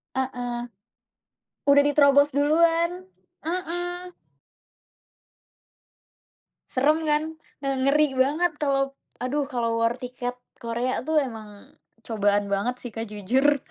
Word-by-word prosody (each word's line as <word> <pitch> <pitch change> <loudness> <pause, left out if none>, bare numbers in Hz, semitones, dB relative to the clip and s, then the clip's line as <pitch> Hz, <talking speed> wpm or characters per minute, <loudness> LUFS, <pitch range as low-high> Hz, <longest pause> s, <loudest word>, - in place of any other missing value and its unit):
Heeh. 245 -2 -3 1.1
Udah 285 0 +7
diterobos 285 0 +5
duluan, 330 +4 +3 0.6
heeh. 355 +1 -4 2.6
Serem 295 +5 +3
kan, 300 0 +3 0.4
eee, 275 0 +1
ngeri 295 +3 +4
banget 290 +7 +2
kalau 275 -1 +1 0.3
aduh, 280 +3 0
kalau 230 -3 -1
war 230 +1 +3
tiket 250 0 -5 0.2
Korea 235 +2 -1
tuh 315 +2 0
emang 220 -7 -4 0.3
cobaan 205 -2 +1
banget 205 +6 0
sih, 245 - -7
Kak, 225 -1 -5
jujur. 255 +8 +2
270 Hz, 100 wpm, -25 LUFS, 240-300 Hz, 2.6 s, Udah